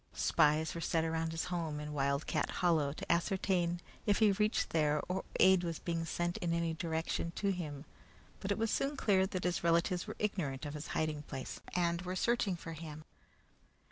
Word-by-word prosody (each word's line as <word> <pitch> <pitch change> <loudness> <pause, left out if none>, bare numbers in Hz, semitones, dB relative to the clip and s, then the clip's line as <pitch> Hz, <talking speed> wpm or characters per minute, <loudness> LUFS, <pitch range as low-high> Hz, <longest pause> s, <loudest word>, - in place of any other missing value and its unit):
Spies 155 +1 +3
were 170 - -5
set 165 -1 +1
around 165 0 -1
his 165 0 -2
home, 160 -4 -2
in 150 0 -5
Wildcat 140 0 0
Hollow, 160 -5 +2
to 145 - -3
ascertain 175 -1 +1 0.3
if 205 - +4
he 215 -2 +5
reached 210 +2 +1
there 150 -2 +2
or 185 +1 -2 0.2
aid 190 -1 +6
was 165 -2 -2
being 165 -1 -2
sent 175 +1 -1
in 170 -1 -1
any 170 -1 0
direction 165 0 -2
to 200 -1 +1
him; 155 -5 -5 0.5
but 195 - -3
it 200 - +1
was 225 0 0
soon 275 +1 0
clear 190 -5 +3
that 185 -2 -3
his 180 0 0
relatives 170 +2 +2
were 215 - -5
ignorant 155 -10 -2
of 145 - -4
his 150 0 -6
hiding 155 -1 0
place, 135 -3 -6 0.2
and 170 -1 +1
were 180 0 -4
searching 225 -3 +1
for 165 -1 -7
him. 155 -1 -8
170 Hz, 190 wpm, -34 LUFS, 155-185 Hz, 0.5 s, aid